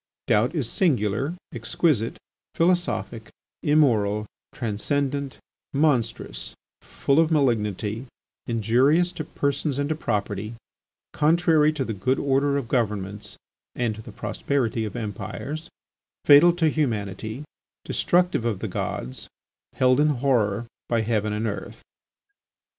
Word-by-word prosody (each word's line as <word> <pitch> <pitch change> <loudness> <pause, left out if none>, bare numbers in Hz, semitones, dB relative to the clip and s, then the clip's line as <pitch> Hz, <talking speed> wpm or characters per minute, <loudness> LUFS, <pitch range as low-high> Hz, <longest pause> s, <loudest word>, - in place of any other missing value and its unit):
Doubt 120 +10 +2
is 140 -8 0
singular, 135 - +1 0.2
exquisite, 115 +1 0 0.4
philosophic, 175 +1 0 0.3
immoral, 110 -9 +3 0.3
transcendent, 135 +5 -2 0.4
monstrous, 135 -6 0 0.3
full 140 +2 +1
of 165 -1 +4
malignity, 115 - 0 0.4
injurious 130 - +3
to 155 - -5
persons 140 -1 -1
and 145 0 0
to 155 - 0
property, 105 -4 -2 0.6
contrary 155 0 +4
to 140 -4 -2
the 115 - -3
good 115 +7 0
order 140 +1 +2
of 135 -4 -3
governments, 105 -4 -2 0.4
and 120 -3 0
to 110 - -9
the - - -11
prosperity 115 -5 -1
of 105 - -6
empires, 110 - -5 0.6
fatal 145 +5 +8
to 165 -2 +3
humanity, 110 -3 -2 0.4
destructive 175 -7 +2
of 115 -4 0
the - - -4
gods, 65 +1 -4 0.5
held 130 +1 +3
in 150 - +5
horror 120 -6 +1 0.2
by 115 -1 +2
heaven 110 -1 0
and 105 +2 -2
earth. 105 -2 -5
125 Hz, 115 wpm, -25 LUFS, 110-150 Hz, 0.6 s, fatal